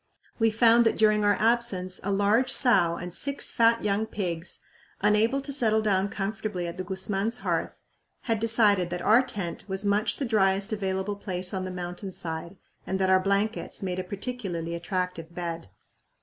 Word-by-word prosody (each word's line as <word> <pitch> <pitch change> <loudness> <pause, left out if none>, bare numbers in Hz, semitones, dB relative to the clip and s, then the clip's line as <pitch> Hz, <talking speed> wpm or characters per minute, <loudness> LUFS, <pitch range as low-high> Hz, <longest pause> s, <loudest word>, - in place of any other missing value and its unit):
We 225 0 +4
found 230 +1 +5
that - - 0
during 215 -1 +4
our 205 0 +4
absence 215 -5 0
a 200 - -1
large 205 +6 +2
sow 235 -11 +4
and 175 0 -7
six 280 +6 -1
fat 230 0 +3
young 210 +1 0
pigs, 175 -5 -4 0.4
unable 215 +6 +2
to 280 +1 -5
settle 220 -5 +2
down 200 -2 +1
comfortably 210 -2 -3
at 170 +1 -7
the 185 - -3
Guzman 195 +2 -1
hearth, 235 - -3 0.4
had 225 -3 -1
decided 210 -5 +3
that 175 0 -4
our 225 +4 +6
tent 210 -10 -5
was 190 +1 -3
much 205 +1 +1
the 275 - -2
driest 195 -2 +1
available 195 0 -2
place 185 -2 -4
on 190 -1 -2
the - - -4
mountain 180 +2 -6
side 170 +1 -5 0.3
and 190 - -1
that 190 0 +2
our 190 - +6
blankets 200 +3 -1
made 185 -1 -2
a - - -2
particularly 190 -4 -4
attractive 170 -1 -4
bed. 170 - -5
200 Hz, 175 wpm, -27 LUFS, 185-220 Hz, 0.4 s, our